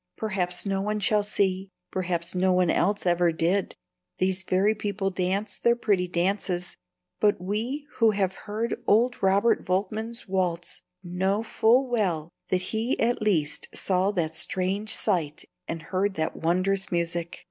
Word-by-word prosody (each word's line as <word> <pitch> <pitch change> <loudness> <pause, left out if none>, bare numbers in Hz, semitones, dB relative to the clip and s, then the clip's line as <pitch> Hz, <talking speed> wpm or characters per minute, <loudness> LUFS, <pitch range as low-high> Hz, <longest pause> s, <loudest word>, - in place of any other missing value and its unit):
Perhaps 185 -4 0
no 195 -1 0
one 210 +1 -1
shall 210 +1 +2
see, 195 -2 -1 0.2
perhaps 175 -2 -1
no 185 0 +2
one 180 -2 +3
else 205 +2 +1
ever 175 -1 +3
did 175 +4 0
see, - - -34 0.4
these 185 0 +1
fairy 190 +3 +2
people 200 -2 -2
dance 190 +3 -2
their 235 0 +3
pretty 200 -6 +1
dances; 180 0 -1 0.4
but 205 -3 +3
we 225 - -3
who 225 -2 +5
have 195 -3 0 0.2
heard 230 +3 -2
old 240 +4 +3
Robert 200 +4 +3
Volkmann's 215 +5 -2
waltz 180 -3 -2 0.2
know 190 +4 0
full 240 +4 +3
well 180 -10 -1 0.2
that 180 - +1
he 225 +3 0
at 240 +1 +1
least 165 -8 0
saw 185 0 +2
that 170 -6 -1
strange 190 +5 0
sight 170 -11 0 0.2
and 165 0 -5
heard 190 +3 -1
that 160 0 -2
wondrous 185 +4 0
music. 170 0 -2
190 Hz, 150 wpm, -26 LUFS, 180-210 Hz, 0.4 s, who